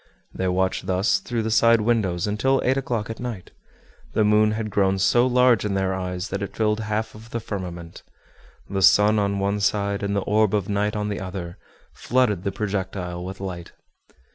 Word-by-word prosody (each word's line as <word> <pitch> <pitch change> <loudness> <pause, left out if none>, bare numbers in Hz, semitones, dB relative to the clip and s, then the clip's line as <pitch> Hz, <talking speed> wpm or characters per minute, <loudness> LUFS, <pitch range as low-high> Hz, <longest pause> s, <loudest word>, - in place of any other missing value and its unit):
They 95 - -2
watched 95 +1 0
thus 95 +3 +2
through 120 -2 -3
the 110 - -2
side 115 0 +5
windows 105 -6 +1
until 130 +6 +1
eight 130 - +3
o'clock 120 -5 -2
at 115 - -8
night. 120 -7 -6 0.6
The 110 - +2
moon 105 0 +4
had 110 -1 -4
grown 95 -1 +2
so 120 +6 +3
large 125 -2 +4
in 105 -2 -1
their 95 -1 0
eyes 90 0 -4
that 100 +1 -3
it 100 - -5
filled 105 -1 +1
half 110 0 -2
of 110 +1 -13
the 115 - -3
firmament. 90 -6 -7 0.7
The 95 0 -2
sun 105 +3 +5
on 100 -1 0
one 100 +1 0
side, 100 0 0
and 100 0 -1
the 100 - +1
orb 105 +1 +2
of 100 -3 -1
night 105 +1 -1
on 105 0 -2
the 100 - -3
other, 90 -2 -6 0.3
flooded 115 -7 0
the 100 - -1
projectile 95 -4 -4
with 95 +2 -7
light. 90 -3 -7
105 Hz, 190 wpm, -23 LUFS, 95-110 Hz, 0.7 s, side